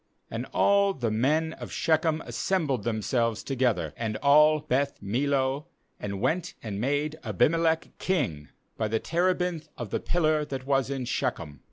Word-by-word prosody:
6And - - -4
all 200 -1 +3
the 120 -4 -1
men 155 +8 +1
of - - -9
Shechem 160 -1 +1
as - - -8
sembled 155 - 0
themselves 115 0 0
together, 130 -4 0
and 110 -2 -3
all 150 +2 +5
Beth 140 0 -1
millo, 135 +6 0 0.3
and 100 -1 -4
went 165 - -1
and 105 -2 -4
made 145 +4 -1
Abim 125 +6 +2
elech 165 -1 +1
king, 110 - -1 0.3
by 110 - 0
the 110 +1 0
terebinth 175 -2 0
of 120 -5 -6
the - - 0
pillar 155 -3 +1
that 135 -3 -5
'was 135 -1 +1
in 135 -2 -3
Shechem. 75 -9 -2
140 Hz, 160 wpm, -27 LUFS, 120-160 Hz, 0.3 s, all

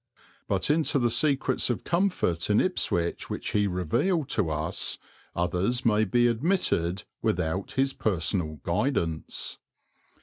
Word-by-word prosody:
But 100 +8 +1
into 155 -2 +2
the 120 -3 +2
secrets 135 -2 +2
of 120 - -2
comfort 170 - 0
in 105 - +4
Ipswich 85 - 0
which - - -3
he 105 -1 +2
revealed 100 - 0
to 100 -7 0
us 75 +2 -1 0.4
others 90 +8 0
may 110 -1 +3
be 120 +5 +2
admitted 115 - +1 0.2
without 85 +5 -1
his 135 0 +1
personal 85 -5 -1
guidance. 85 - -2
105 Hz, 125 wpm, -27 LUFS, 85-135 Hz, 0.4 s, in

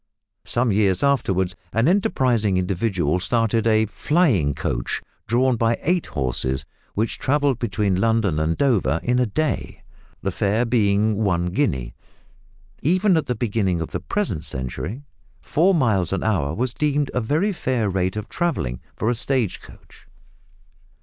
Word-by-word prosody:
Some 120 -1 +1
years 95 -2 +2
afterwards 95 -10 +1 0.2
an 115 +3 +2
enterprising 125 - +2
individual 90 -3 0
started 115 +2 +1
a 110 0 +4
"flying 110 - +1
coach" - - -2 0.3
drawn 125 +2 +2
by 115 +1 +1
eight 175 +2 +1
horses, 65 -1 -2 0.3
which 110 +3 -1
travelled 140 -2 +1
between 100 -4 0
London 110 -8 +2
and 80 +1 0
Dover 100 - +2
in 125 +1 +1
a 125 - +2
day 155 +8 -2 0.4
the - - 0
fare 105 +4 +1
being 105 -2 +2
one 90 -5 +1
guinea. 65 - -1 0.9
Even 185 +5 +3
at 160 - 0
the 125 - -1
beginning 100 -6 0
of 80 - -4
the 90 - -2
present 100 - -2
century 65 - -4 0.4
four 180 +5 +2
miles 105 - +2
an 95 - -1
hour 90 -11 0
was 125 +1 -1
deemed 145 -1 0
a 125 - 0
very 160 - +1
fair 125 - -1
rate 95 0 -1
of 105 -1 -4
travelling 70 - -2 0.2
for 110 - -2
a 120 - +3
stage 120 -3 0
coach. - - -17
110 Hz, 150 wpm, -22 LUFS, 95-130 Hz, 0.9 s, a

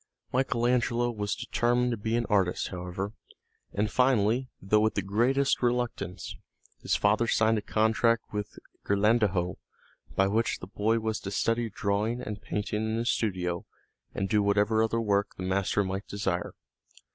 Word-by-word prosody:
Michael 125 -2 +1
Angelo 120 -1 +2
was 105 -3 -2
determined 120 +1 +1
to - - 0
be 110 +2 -1
an 120 0 +1
artist, 95 -4 +1
however, 90 +3 -5 0.6
and 105 +1 -1
finally, 125 0 +2
though 100 +3 +2
with 110 +1 +1
the 100 - 0
greatest 125 +8 +2
reluctance, 120 -7 -2 0.5
his - - +1
father 105 +3 +2
signed 110 0 +3
a - - -7
contract 110 +2 +2
with 105 0 -4 0.3
Ghirlandajo 100 -4 +2 0.6
by 95 - +4
which 110 +4 +1
the - - -8
boy 105 +4 0
was 110 -1 -2
to 100 - -6
study 115 +3 0
drawing 105 +3 -1
and 105 -4 -6
painting 105 0 -2
in 110 0 -1
his 115 +1 +1
studio 90 -5 -2 0.5
and 95 - -1
do 105 0 +2
whatever 105 +2 +2
other 115 +1 +1
work 100 -2 0
the 95 - -6
master 100 +2 +1
might 95 +1 -4
desire. 95 -3 -2
105 Hz, 160 wpm, -28 LUFS, 100-115 Hz, 0.6 s, by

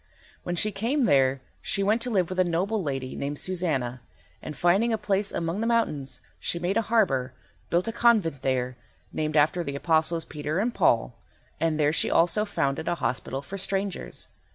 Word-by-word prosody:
When 175 - -3
she 210 +5 +2
came 240 +8 0
there 135 - +3 0.2
she 200 - -1
went 215 +4 +2
to 250 - 0
live 185 -7 +1
with 185 - -3
a - - +6
noble 185 +5 0
lady 135 -5 -3
named 145 +1 -3
Susanna, 140 -10 -1 0.4
and, 150 - -7
finding 195 +7 +3
a 225 - +1
place 200 -1 0
among 170 +5 -2
the 230 - 0
mountains, 155 - 0 0.2
she - - -2
made 175 +3 -1
a 225 - +3
harbour, 175 - +1 0.4
built 175 +4 +1
a - - 0
convent 220 - +3
there 125 -1 -1 0.4
named 155 0 -1
after 155 +4 +3
the 140 -3 -4
apostles 160 +2 +1
Peter 150 +1 -3
and 230 +5 0
Paul, 125 - +2 0.5
and 160 -1 0
there 150 0 +3
she - - +2
also 175 +6 +3
founded 160 -6 -1
a - - +1
hospital 130 0 -3
for 195 +6 -7
strangers. 195 0 -3
170 Hz, 185 wpm, -26 LUFS, 140-200 Hz, 0.5 s, a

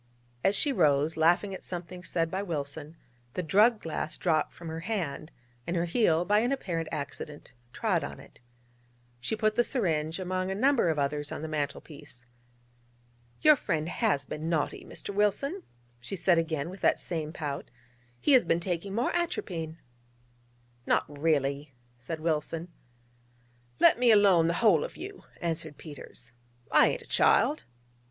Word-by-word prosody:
As 195 - +3
she 285 +4 +1
rose, 150 - +3
laughing 175 +5 +3
at 190 - -8
something 180 0 -6
said 165 -2 -1
by 190 - -1
Wilson, 155 -3 -4 0.4
the 180 - -1
drug 210 +8 +4
glass 160 -2 -4
dropped 160 -3 +1
from 170 - -11
her 160 0 -4
hand, 165 -6 -3 0.4
and 170 - -1
her 170 0 +1
heel, 175 -3 +2
by 210 +3 +4
an 240 +4 +1
apparent 170 -12 -2
accident, 145 +1 -6 0.2
trod - - 0
on - - -6
it. - - -16 0.8
She 125 - -2
put 215 0 +1
the 240 +2 +3
syringe 160 - -1
among 185 0 -2
a 190 - -2
number 255 -3 +3
of 160 - 0
others 145 +1 -1
on - - -5
the - - -3
mantel 150 -2 -2
piece. 145 -5 -13 1.2
'Your 305 0 +7
friend 165 - -2
has 180 - 0
been 155 +3 -4
naughty, 160 -3 -1
Mr. 200 - -6
Wilson,' 240 - +1 0.4
she 120 +11 -6
said 175 -2 +3
again 160 -1 -2
with 190 - -11
that - - +3
same 160 -3 -3
pout: 145 -4 -5 0.5
'he - - +2
has 255 - +7
been 165 -1 +1
taking 180 +2 -3
more 240 +2 0
atropine.' 175 - -2 1.1
'Not - - +3
really?' 145 -2 -1 0.2
said 155 +7 -5
Wilson. 160 +1 -2 1.1
'Let - - +6
me 245 -1 +4
alone, 200 -6 +6
the 170 - +1
whole 170 -9 +5
of - - -7
you,' 390 +2 -9
answered 160 -3 -3
Peters: 135 -5 -10 0.4
'I - - +7
ain't - - -1
a - - -17
child.' 305 -8 +3
170 Hz, 160 wpm, -29 LUFS, 155-200 Hz, 1.2 s, Your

